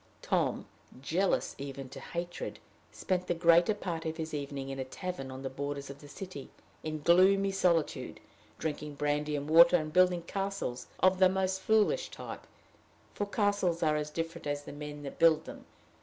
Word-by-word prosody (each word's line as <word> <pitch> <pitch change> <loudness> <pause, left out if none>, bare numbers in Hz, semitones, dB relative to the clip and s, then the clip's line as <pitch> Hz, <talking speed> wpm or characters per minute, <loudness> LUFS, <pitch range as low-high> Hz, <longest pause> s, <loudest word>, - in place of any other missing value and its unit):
Tom, - - 0 0.3
jealous 170 +9 0
even 135 -1 -6
to 135 - -9
hatred, 175 0 -5 0.3
spent 180 -1 -2
the 175 - 0
greater 170 +4 +5
part 170 -5 -4
of 160 0 -3
his 160 -1 -5
evening 140 -2 -4
in 135 0 -5
a - - -1
tavern 135 0 -6
on 130 +1 -8
the - - -2
borders 140 0 -4
of 140 - -12
the 145 - -12
city 165 -2 -8 0.3
in 155 -1 -5
gloomy 195 +3 +5
solitude, 175 -5 0 0.4
drinking 150 -1 -4
brandy 150 +1 0
and 145 0 -3
water, 170 +3 +8
and 155 -2 -4
building 180 -1 +4
castles 195 -9 -3
of 185 0 +4
the 185 -1 +7
most 190 0 0
foolish 220 - +2
type - - -8 0.7
for 205 - -2
castles 200 -5 +1
are 155 -1 +3
as 150 0 -2
different 165 +1 -4
as 145 0 -2
the - - -9
men 145 0 -7
that 140 - -8
build 160 -1 +5
them. - - -10
165 Hz, 175 wpm, -31 LUFS, 145-185 Hz, 0.7 s, water